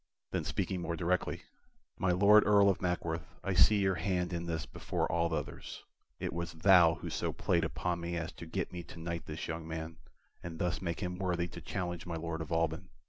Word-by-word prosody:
Then - - -1
speaking 95 -2 -1
more 85 -1 -2
directly: 90 +2 0 0.6
"My 95 - +2
Lord 100 +4 +7
Earl 100 -1 +6
of 95 - -4
Mackworth, 85 -2 -2
I - - 0
see 105 - +6
your 95 -1 +3
hand 90 0 -1
in 85 0 -3
this 80 -2 -2
before - - -2
all 85 0 +1
others. 80 - -4 0.4
It - - -3
was 85 0 -3
thou 85 0 +6
who - - -6
so - - -1
played - - +1
upon 85 +5 -1
me 85 0 -2
as 85 -1 -3
to 85 - -10
get 90 +2 -2
me 90 - -4
to 85 - -12
knight 85 0 -4
this 75 0 -5
young 80 0 -4
man, 80 0 -5 0.4
and 85 -1 -6
thus 90 +2 -1
make 85 -1 -3
him 90 -1 -3
worthy 90 -2 0
to - - -9
challenge 90 -1 -4
my 85 - -3
Lord 80 0 -3
of 80 - -6
Alban. 80 0 0
85 Hz, 210 wpm, -33 LUFS, 80-90 Hz, 0.6 s, Lord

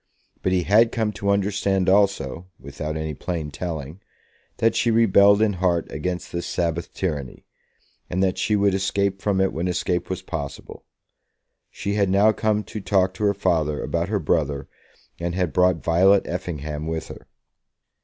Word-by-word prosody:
But 95 - 0
he 90 -1 +2
had 110 +6 +4
come 110 -2 -1
to 100 -1 -3
understand 100 -1 +1
also, 95 -5 +1
without 75 +4 -5
any 80 -1 -3
plain 80 -1 -4
telling, 80 0 -6 0.6
that 115 - +2
she 120 - +2
rebelled 100 -2 +5
in 105 -2 +2
heart 85 -3 +1
against 90 -1 -4
this 85 0 -4
Sabbath 85 -1 -2
tyranny, 75 -8 -4 0.6
and 95 +2 0
that 95 -1 0
she 105 - +1
would 100 -1 +2
escape 95 0 0
from 100 -2 0
it 95 0 +1
when 85 +3 -2
escape 90 0 -1
was 95 0 -4
possible. 75 -6 -7 0.8
She 100 - -4
had 100 -2 +1
now 100 +3 +5
come 110 0 0
to 105 - -7
talk 95 -2 +2
to 95 - -6
her 100 -1 +2
father 80 -6 0
about 85 +2 -2
her 105 - +1
brother, 75 -5 -1 0.5
and 85 0 -3
had 90 -6 -1
brought 90 -2 +2
Violet 95 +4 +4
Effingham 75 -4 -4
with 80 0 -4
her. - - -11
90 Hz, 165 wpm, -23 LUFS, 80-100 Hz, 0.8 s, rebelled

